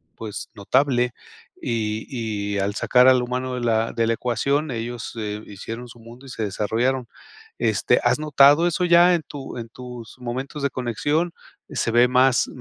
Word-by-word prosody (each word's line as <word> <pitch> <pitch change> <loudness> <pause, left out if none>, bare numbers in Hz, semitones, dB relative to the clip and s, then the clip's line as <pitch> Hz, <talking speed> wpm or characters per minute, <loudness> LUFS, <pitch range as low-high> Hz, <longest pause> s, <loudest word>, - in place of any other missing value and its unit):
pues 110 -2 -7
notable 125 +3 +1 0.5
y 110 -2 -2 0.5
y - - 0
al 100 +1 -1
sacar 125 +3 +4
al 130 -1 +6
humano 125 +1 -3
de 125 - -4
la 115 -1 +1
de 115 -1 +1
la 115 - +2
ecuación, 140 +5 -1
ellos 120 0 -5 0.3
hicieron 115 +4 -8
su 120 0 -14
mundo 120 +4 -14
y - - -11
se 115 -3 -4
desarrollaron, 115 +5 -1 0.5
este, - - +2
¿has - - +2
notado 150 +2 +5
eso 175 +1 0
ya 175 +1 +6
en 165 - -3
tu 140 -4 -8
en 115 -1 -6
tus 125 -1 -10
momentos 130 +4 -5
de 140 - +2
conexión? 145 +8 -1 0.4
¿Se - - -1
ven 120 +2 +4
más 130 0 +4
125 Hz, 165 wpm, -23 LUFS, 115-135 Hz, 0.5 s, al